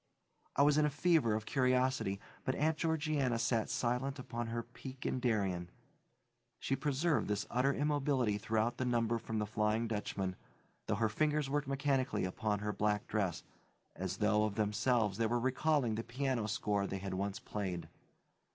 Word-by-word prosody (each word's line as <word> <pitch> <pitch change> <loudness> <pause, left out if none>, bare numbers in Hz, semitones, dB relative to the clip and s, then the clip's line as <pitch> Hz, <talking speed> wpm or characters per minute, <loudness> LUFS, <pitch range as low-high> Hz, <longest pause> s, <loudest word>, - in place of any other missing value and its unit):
I 140 - +5
was 145 +1 +5
in 150 - +4
a - - +1
fever 150 -6 +3
of 110 0 -3
curiosity, 130 -6 +1 0.2
but 130 - 0
Aunt 155 +2 +2
Georgiana 155 -6 +1
sat 115 -1 +1
silent 125 +3 0
upon 120 -2 -4
her 115 +1 -2
peak 130 +3 -10
in 130 - 0
Darien. 100 -8 0 0.9
She 135 - 0
preserved 150 +3 +1
this 105 -1 -1
utter 130 +3 +3
immobility 140 -7 +1
throughout 110 +3 0
the - - -1
number 115 -1 +1
from 115 0 -4
The 105 - 0
Flying 110 +1 0
Dutchman, 100 -3 -2 0.5
though 110 - +1
her 110 +2 +2
fingers 150 +4 0
worked 145 -1 0
mechanically 135 -5 +1
upon 105 +3 -1
her 105 0 -1
black 105 0 0
dress, 100 -5 -1 0.5
as 95 +1 -3
though, 105 0 +3
of 105 -2 -3
themselves, 105 0 +1
they 115 - +3
were 120 +2 +1
recalling 130 0 +1
the 110 +1 -2
piano 125 -2 -1
score 100 -1 0
they 95 - -3
had 95 0 -4
once 100 +1 -2
played. 95 -5 -4
115 Hz, 170 wpm, -35 LUFS, 105-135 Hz, 0.9 s, I